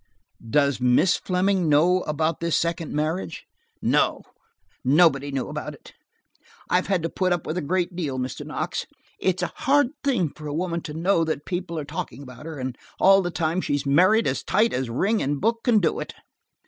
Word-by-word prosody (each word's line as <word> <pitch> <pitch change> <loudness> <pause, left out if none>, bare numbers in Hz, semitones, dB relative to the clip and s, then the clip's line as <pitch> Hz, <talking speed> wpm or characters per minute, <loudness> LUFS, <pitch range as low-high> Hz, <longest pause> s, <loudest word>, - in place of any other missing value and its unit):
"Does 140 -1 +2
Miss 125 +8 +4
Fleming 185 -2 +1
know 175 +5 +4
about 155 +1 0
this 170 -1 +1
second 170 -1 -2
marriage?" 150 - -2 0.4
"No. - - +2 0.6
Nobody 140 -1 +4
knew 135 -2 -2
about - - -5
it. - - -17 0.8
I - - +5
have 185 - -1
had 190 -4 0
to - - +1
put 185 +1 0
up 175 -2 0
with 155 - -3
a 180 - -1
great 175 +3 -1
deal, 150 -7 -3
Mr. 125 0 -4
Knox. - - -4 0.3
It's 180 -1 0
a - - -3
hard 285 -1 +3
thing 220 - +1
for 150 0 -8
a 145 - -3
woman 170 0 -2
to 150 - -6
know 170 +1 +2
that 155 -2 -3
people 175 -2 -4
are 150 - -3
talking 140 -1 -6
about 125 +3 -11
her, 160 -2 -6
and 130 -2 -5 0.2
all 195 +1 +6
the 175 - -2
time 170 +1 -1
she's 145 -3 -1
married 185 +11 +4
as - - -1
tight 220 +3 +2
as 130 -1 -2
ring 200 - +1
and 140 +1 -1
book 230 +3 +1
can 240 -3 +4
do 175 -6 +1
it." - - -6
165 Hz, 200 wpm, -24 LUFS, 145-185 Hz, 0.8 s, all